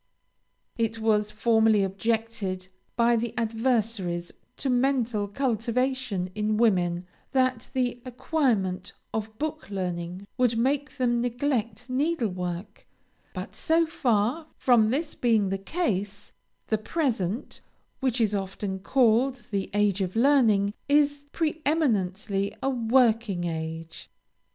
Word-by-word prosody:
It 225 0 0
was 210 -1 +2
formerly 220 -1 +3
objected 195 -2 -2 0.3
by 235 0 +4
the 230 0 -2
adversaries 225 -7 0 0.3
to - - -3
mental 245 -5 +1
cultivation 235 -3 -1
in 215 +1 0
women, 180 -6 +2 0.3
that 255 -3 +1
the 245 -2 0
acquirement 240 - -1 0.2
of 220 0 -4
book 310 0 -4
learning 180 -1 -4
would 240 -2 +3
make 275 +5 0
them 240 -2 +1
neglect 245 -2 -1
needlework; 210 - -2 0.5
but - - -6
so 330 0 +2
far 260 -1 0
from 235 -4 +4
this 300 +6 -1
being 220 -5 +2
the 195 0 -2
case, 205 - -2 0.3
the 220 - 0
present, 225 - -2 0.4
which 260 -2 0
is 215 -3 +2
often 195 0 -3
called 245 +3 +2
the 195 -2 -1
age 205 -1 +2
of 185 +1 -2
learning, 225 -6 +4 0.2
is 290 0 +3
preëminently 215 - 0
a 270 - +2
working 230 -5 +2
age. 160 -1 -5
225 Hz, 110 wpm, -27 LUFS, 200-255 Hz, 0.5 s, by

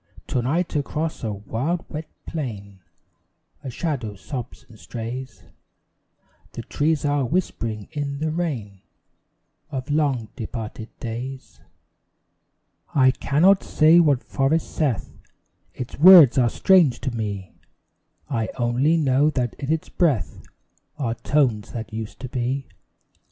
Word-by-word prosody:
To 125 - 0
night 160 +8 -1
across 150 +2 -2
a 110 - -1
wild 115 - -3
wet 155 +1 -7 0.2
plain 100 - -6 0.8
A 135 - -5
shadow 125 -6 -3
sobs 125 +4 -7
and 110 -2 -16
strays; 125 +3 -7 1.1
The - - -6
trees 150 0 0
are 145 -1 +1
whispering 115 - -2
in 145 -2 -3
the 155 +2 -1
rain 125 - -3 0.9
Of 135 0 -4
long 140 -7 +1
departed 110 -2 -6
days. 125 +3 -6 1.3
I 130 -2 +6
cannot 160 +9 +3
say 160 +2 +5
what 145 -6 +3
forest 145 +4 0
saith 140 -10 -1 0.6
Its 125 +1 -7
words 170 -5 +9
are 120 -2 +4
strange 160 - +4
to 130 - -2
me: 100 -4 -4 0.7
I 115 -6 -1
only 130 +7 +2
know 145 -1 +3
that 125 -6 -1
in 140 +1 -2
its 160 -1 -1
breath 135 - 0 0.6
Are 125 -6 -1
tones 120 -5 0
that 115 -1 -6
used 110 -1 -6
to 130 - -5
be. 130 +2 -2
130 Hz, 125 wpm, -23 LUFS, 115-150 Hz, 1.3 s, words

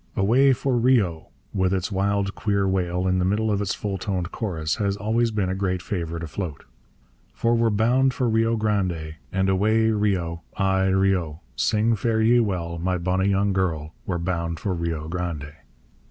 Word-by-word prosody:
Away 125 +8 +4
for 130 0 0
Rio! 105 -11 +2 0.3
with 95 -2 +1
its 90 +1 -2
wild, 100 +1 0
queer 100 -2 0
wail 90 -1 0
in 95 0 +2
the - - +1
middle 105 +4 +1
of 100 -1 0
its 100 -2 -1
full 100 -2 -3
toned 90 -1 -2
chorus, 80 -8 -2
has 100 -2 0
always 115 +3 +1
been 105 -4 -1
a 95 - -1
great 95 -1 -1
favourite 85 -3 -3
afloat: 80 -2 -5 0.7
For 115 - +1
we're 115 -1 +3
bound 120 +5 +3
for 125 -1 -1
Rio 115 0 +2
Grande, 90 -8 -1
And 95 0 +1
away 110 +4 +3
Rio! 95 -6 0 0.2
ay 95 -1 +2
Rio! 95 -5 +1
Sing 110 - +2
fare 110 +1 0
ye 120 +2 +5
well, 85 -6 -1
my 90 +2 0
bonny 95 +2 0
young 100 0 +2
girl, 80 -5 -1
We're 90 - -1
bound 85 -2 -2
for 100 - -2
Rio 85 -2 -3
Grande. 80 -4 -4
95 Hz, 175 wpm, -24 LUFS, 85-110 Hz, 0.7 s, ye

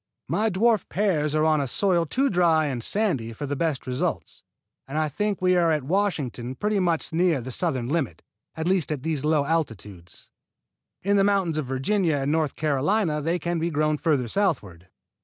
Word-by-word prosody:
My 220 +1 +1
dwarf 215 +1 +2
pears 160 -7 0
are 155 0 +2
on 155 -2 +3
a 140 - -2
soil 175 +2 +1
too 270 - +1
dry 170 -4 +3
and 130 -5 -3
sandy 140 - 0
for 145 - -5
the 145 0 -3
best 155 -2 -1
results, 125 -1 -3 0.5
and 140 +3 -4
I 155 0 +1
think 205 +7 -2
we 185 0 +4
are 170 -2 +3
at 150 -3 0
Washington 140 -8 -1
pretty 210 +6 0 0.3
near 165 -2 +2
the 130 +2 -6
southern 130 -5 0
limit, 135 - -2 0.3
at 160 +1 -3
least 185 -5 +1
at 145 -2 -4
low 150 -1 +1
altitudes. 105 - -4 0.7
In 200 +2 +2
the 195 - +4
mountains 195 -6 +1
of 145 - -4
Virginia 160 +6 0
and 140 0 -1
North 155 -3 0
Carolina 155 +3 0
they 165 +4 0
can 170 0 -2
be 165 +1 0
grown 155 -1 0
further 140 -7 +1
southward. 110 - -2
155 Hz, 180 wpm, -25 LUFS, 135-180 Hz, 0.7 s, we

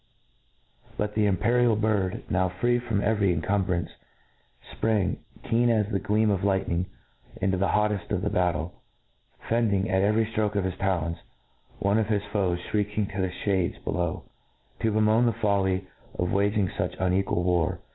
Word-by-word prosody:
But 105 0 -1
the 105 -1 +2
imperial 115 +4 +3
bird, 105 -4 0
> - - -29
now 95 0 +2
free 120 +7 +1
froni 115 -4 -1
every 105 -3 +2
incumbrance, 90 -1 0 0.9
fprang, 110 -4 +1 0.3
keen 120 +1 +2
as 110 -3 +2
the 100 - +1
gleam 105 +2 +1
©f 100 -2 +1
ligtitening, 95 -3 0 0.5
into 95 0 +1
the 95 +2 +1
hoteft 105 -2 0
of - - -1
the - - 0
battle, 90 -1 -1 0.7
fendr 115 -2 +2
ing, 100 +2 0
at 95 0 +3
every 110 +3 +3
ftroke 110 -1 -1
of 100 - +1
his 95 -1 -2
talons, 85 -4 0 0.6
one 100 +2 +2
of 110 - 0
his 105 -2 +1
foe^ 95 -4 +1
flirieking 105 -1 -1
to 100 - -2
the 95 - 0 0.2
fliades 95 -4 +1
below, 85 -1 -2 0.6
to 110 - +1
bemoan 110 +3 +3
the 115 - +2
fol 100 -3 +2
ly 95 0 0 0.3
of 90 0 -1
waging 100 -1 +1
fuch - - -3
unequal 95 -1 +1
war. 90 0 +1
100 Hz, 165 wpm, -26 LUFS, 95-110 Hz, 0.9 s, imperial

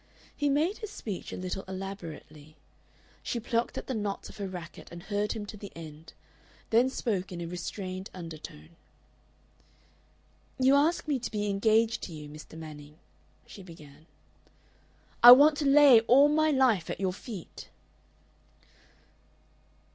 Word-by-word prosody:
He 290 -1 0
made 315 +9 0
his 430 - -6
speech 210 - -7
a - - -6
little 185 +1 -5
elaborately. 170 -5 -9 0.7
She 240 - -3
plucked 235 +1 -2
at - - -5
the 260 - -4
knots 205 -3 -4
of - - -13
her 200 -2 -4
racket 175 -3 -9
and 170 0 -10
heard 205 0 -2
him 215 -2 -6
to 210 - -9
the 200 0 -10
end, 160 -1 -11 0.6
then 240 +3 +4
spoke 200 -8 -3
in 175 - -6
a 170 - -4
restrained 185 +2 -6
undertone. 165 -3 -10 1.9
"You 260 +1 +4
ask 310 +4 +2
me 285 -3 0
to 245 - -5
be 210 -1 -3
engaged 220 +3 +2
to 175 - -7
you, 150 -1 -9
Mr. 155 +2 -12
Manning," 150 -1 -11 0.5
she 200 - -12
began. 155 -4 -15 1.1
"I 240 +1 +12
want 290 +4 +6
to 295 - -2
lay 275 -3 +7
all 265 +6 +5
my 310 +1 +2
life 255 - +2
at - - -4
your 190 -2 -1
feet." 200 -2 -10
200 Hz, 145 wpm, -28 LUFS, 170-250 Hz, 1.9 s, I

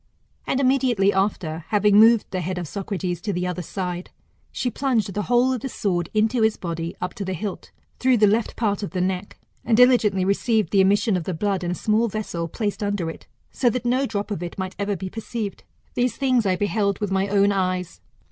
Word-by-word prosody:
] - - -39
And 265 - 0
immediately 255 -7 +3
after, 175 -5 -1
having 205 +2 +4
moved 225 0 +6
the 185 -1 -2
head 180 +2 -3
of 175 -2 -4
Socrates 185 -2 -4
to 210 - -2
the 180 -1 -2
other 180 0 -3
side, 180 0 -4 0.4
she 250 - -2
plunged 225 -7 0
the 210 - -1
whole 245 +4 +2
of 250 - -3
the 270 - -4
sword 175 -7 -1
into 220 +3 +1
his 220 -1 +2
body 170 -1 -4
up 180 - -3
to 200 - -5
the 190 -1 -3
hilt, 200 +2 -5 0.3
through 255 -1 +3
the 210 - +5
left 215 +2 +1
part 210 -2 0
of 200 - -5
the 185 - -1
neck, 185 +2 -2 0.3
and 225 -1 +2
diligently 225 -7 +4
received 215 +2 +1
the 195 - +5
emission 205 +2 +3
of 175 -3 -2
the 185 - -2
blood 195 +1 -1
in 175 - -2
a 180 - -1
small 220 +4 +1
vessel 200 -6 -3
placed 205 +5 -3
under 200 -5 -1
it, - - -14 0.2
so 250 - +2
that 245 +1 -3
no 255 +3 +2
drop 205 -1 -3
of 195 - -3
it 175 -1 -6
might 190 -1 -4
ever 200 0 -1
be 190 - -5
perceived. 220 0 -5 0.3
These 245 0 0
things 255 -6 +2
I 185 - +2
beheld 200 0 0
with 205 -2 -3
my 195 +1 +1
own 200 0 +3
eyes. 185 -2 -2
200 Hz, 225 wpm, -23 LUFS, 185-225 Hz, 0.4 s, moved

